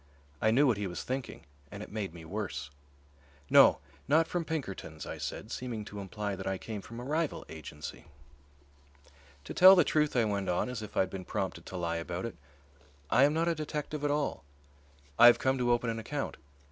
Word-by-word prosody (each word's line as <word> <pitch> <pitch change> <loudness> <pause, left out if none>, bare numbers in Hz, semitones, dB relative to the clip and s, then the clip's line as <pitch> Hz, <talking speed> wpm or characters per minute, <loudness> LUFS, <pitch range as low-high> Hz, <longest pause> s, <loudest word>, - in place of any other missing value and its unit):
I 110 - +4
knew 130 +6 +5
what 125 -7 +3
he 100 -1 -2
was 90 - -5
thinking, 130 -9 -5 0.2
and 100 +5 -7
it - - -11
made 105 -4 -3
me 85 -1 -11
worse. 80 -7 -4 0.8
"No, - - +8 0.3
not 160 +3 +4
from 175 -1 -1
Pinkerton's," 100 - -5
I - - -6
said, 110 - -5
seeming 115 -4 -4
to 100 0 -8
imply 100 +1 -4
that 95 0 -6
I 95 0 -1
came 105 +1 -6
from 115 +4 -9
a - - -6
rival 155 +3 -1
agency. 80 -3 -8 1.4
"To - - -7
tell 185 +1 +9
the 175 - +6
truth," 150 -1 +1
I 120 -2 +4
went 100 -2 -1
on, 90 +7 0
as 125 -4 -4
if 105 - -8
I - - +5
had 95 - -1
been 95 -1 -5
prompted 95 0 -4
to 95 - -6
lie 85 -1 -1
about 85 +4 -4
it, 115 - -5 0.8
"I 130 +3 +6
am 145 - +2
not 165 +1 +1
a 170 - +3
detective 150 -1 -4
at 145 - +1
all. 145 - -1 0.8
I 120 - +11
have 120 - +8
come 130 0 +1
to 120 -1 +2
open 120 -1 +1
an 115 - -4
account. 140 +5 -4
115 Hz, 210 wpm, -31 LUFS, 95-145 Hz, 1.4 s, I